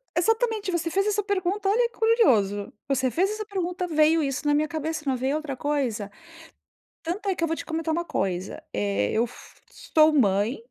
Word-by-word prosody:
Exatamente. 445 +1 +1
Você 335 -1 -1
fez 390 +4 +1
essa 415 0 +1
pergunta, 390 0 -1
olha 470 +3 +3
que - - -25
curioso. 225 - +3
Você 265 -2 +1
fez 375 +8 +1
essa 430 0 -4
pergunta, 360 -3 -3
veio 315 0 +3
isso 275 +1 -2
na 290 - +4
minha 305 +1 +2
cabeça, 315 0 -3
não 265 - +2
veio 265 +4 0
outra 295 -4 -5
coisa. 250 -8 -2 0.9
Tanto 395 +5 -3
é 380 - +1
que 335 - -3
eu - - +2
vou 325 - -1
te - - -7
comentar 320 0 -2
uma 340 +2 -1
coisa, 190 - -3
eh, 100 0 0
eu 230 +2 +2
fu 240 - -15
sou 310 0 +3
mãe 210 -2 +2
320 Hz, 195 wpm, -25 LUFS, 260-390 Hz, 0.9 s, na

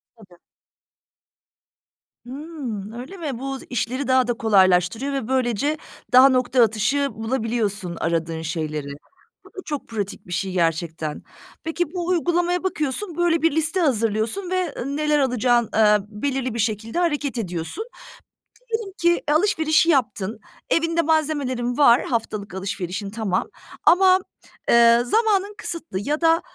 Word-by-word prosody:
Tabii. 185 -6 -19 1.9
Hımm, 260 -8 -6
öyle 260 +11 -8
mi? 285 -8 -4
Bu 270 0 -4
işleri 250 +2 -2
daha 260 -1 +3
da 240 - +1
kolaylaştırıyor 205 +4 +2
ve 265 -5 -3
böylece 260 +3 0 0.4
daha 260 +2 +8
nokta 255 -1 +3
atışı 245 +6 +1
bulabiliyorsun 220 -6 -2
aradığın 165 -1 -1
şeyleri. 155 -2 -3 0.6
Bu - - -15
da 420 - -26
çok 295 -3 -5
pratik 205 -4 -5
bir - - -10
şey 190 +1 -2
gerçekten. 165 -3 -2 0.4
Peki, 325 +1 -2
bu 350 -1 -3
uygulamaya 350 0 +1
bakıyorsun, 330 +1 -2
böyle, 340 -2 +2
bir 330 - +3
liste 320 +4 +1
hazırlıyorsun 230 - 0
ve, 370 -5 -1
ı 280 +3 -3
neler 300 -1 +2
alacağın, 245 -3 +2
eee, 210 -1 +5
belirli 255 +2 -2
bir 230 - -4
şekilde 220 - -1
hareket 295 -7 -1
ediyorsun. 180 - -4 0.8
Diyelim 445 -3 -3
ki 345 0 +3
alışverişi 315 -2 +3
yaptın, 220 - 0 0.3
evinde 330 0 +2
malzemelerin 285 -6 0
var, 250 -4 +6
haftalık 215 -4 -3
alışverişin 195 0 -4
tamam. 205 -4 -2 0.3
Ama, 370 +1 +6 0.5
eee, 235 0 +6
zamanın 415 - +1
kısıtlı 330 - -4
ya 300 +8 -2
da 330 0 +4
255 Hz, 130 wpm, -22 LUFS, 210-320 Hz, 1.9 s, daha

